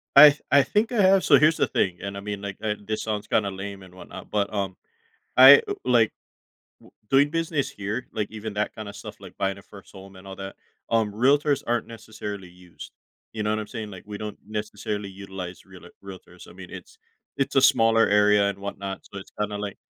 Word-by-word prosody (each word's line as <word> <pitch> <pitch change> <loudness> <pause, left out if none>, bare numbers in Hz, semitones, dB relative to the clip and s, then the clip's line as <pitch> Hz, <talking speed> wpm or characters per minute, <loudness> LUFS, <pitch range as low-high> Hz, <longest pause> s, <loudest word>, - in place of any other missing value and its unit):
I 150 +2 +11
th 150 - -11
I 140 -1 +6
think 210 - 0
I 235 -4 +2
have 190 0 +5
so, 140 - +6
here's 155 +4 +4
the 140 - +2
thing 95 -5 -1
and 100 0 -5
I - - -5
mean, 105 -1 -5
like 100 -1 -6
and, 105 -2 -4
this 110 0 -2
sounds 105 -2 -3
kinda 100 -2 +1
lame, 95 0 -7
and 90 -1 -15
whatnot, 95 - -11
but, 100 -1 0
um, 95 -2 -2 0.6
I, 135 +2 +10
uh, - - -1
like, 120 -3 +3 0.7
w - - -19 0.2
doing 140 +2 +4
business 160 -3 -1
here, 110 +1 -5
like, 105 -2 -2
even 110 -1 -6
that 105 +1 -1
kinda 105 -2 -7
stuff, - - -10
like, - - -13
buying 95 0 -1
a - - -12
first 100 0 -15
home 95 0 -13
and 95 +1 -13
all 95 - -8
that, 95 0 -8 0.3
um, 110 -2 +1
realtors 140 +5 +2
aren't 120 -1 -1
necessarily 105 -4 -8
used, 90 -1 -13 0.4
you 110 -1 -3
know 105 - -1
what 110 - -1
I'm 105 - -6
saying, 110 -2 -6
like, 95 -2 -10
we 105 0 -7
don't 105 0 -7
necessarily 105 -1 -5
utilize 95 -2 -9
realer - - -14
realtors, - - -12
I - - -14
mean, - - -11
it's 450 - -11 0.4
it's 135 - -1
a 135 - +5
smaller 115 -2 +5
area 105 0 +4
and 100 -1 -6
whatnot, 100 -1 -6
so - - -11
it's 95 - -10
kinda 105 0 -2
like 100 -1 -5
105 Hz, 220 wpm, -25 LUFS, 100-120 Hz, 0.7 s, I